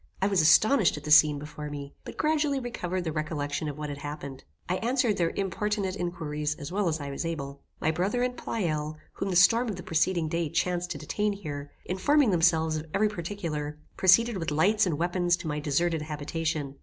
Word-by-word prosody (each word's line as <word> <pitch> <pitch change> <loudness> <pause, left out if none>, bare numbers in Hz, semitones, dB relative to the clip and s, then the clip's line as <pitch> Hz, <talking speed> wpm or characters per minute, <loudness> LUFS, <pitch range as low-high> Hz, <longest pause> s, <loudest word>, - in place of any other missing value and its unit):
I 190 - +1
was 195 -3 +3
astonished 210 - +5
at 150 - -8
the 150 - -4
scene 150 -1 +7
before 150 +1 -7
me, 140 -1 -7
but - - -9
gradually 300 -2 +1
recovered 185 -7 -3
the 160 - -2
recollection 155 -1 -2
of 145 - -7
what 150 -1 -4
had 145 0 -6
happened. 140 -2 -7 0.2
I 180 - 0
answered 240 -1 +1
their 170 -2 +2
importunate 200 0 -1
inquiries 150 -5 -3
as 150 0 -8
well 200 0 0
as 160 -1 0
I 140 -1 -5
was 140 - -4
able. 140 -4 -5 0.2
My 160 - +1
brother 195 +9 0
and 250 0 -1
Pleyel, 155 -11 -2 0.2
whom 195 - -3
the 185 - -1
storm 225 +7 +5
of 205 - -3
the 180 - -8
preceding 165 +1 +1
day 165 0 -1
chanced 175 +1 -1
to - - -4
detain 210 0 -1
here, 145 -7 -6 0.2
informing 250 +7 +3
themselves 160 -2 +3
of 155 +1 -6
every 210 +2 +3
particular, 165 -6 -4 0.2
proceeded 215 +4 +4
with 165 -3 -2
lights 190 +8 +3
and 160 -5 -1
weapons 175 +1 +1
to 180 - -7
my 150 -1 -2
deserted 160 +3 0
habitation. 150 -1 -3
170 Hz, 205 wpm, -28 LUFS, 150-195 Hz, 0.2 s, scene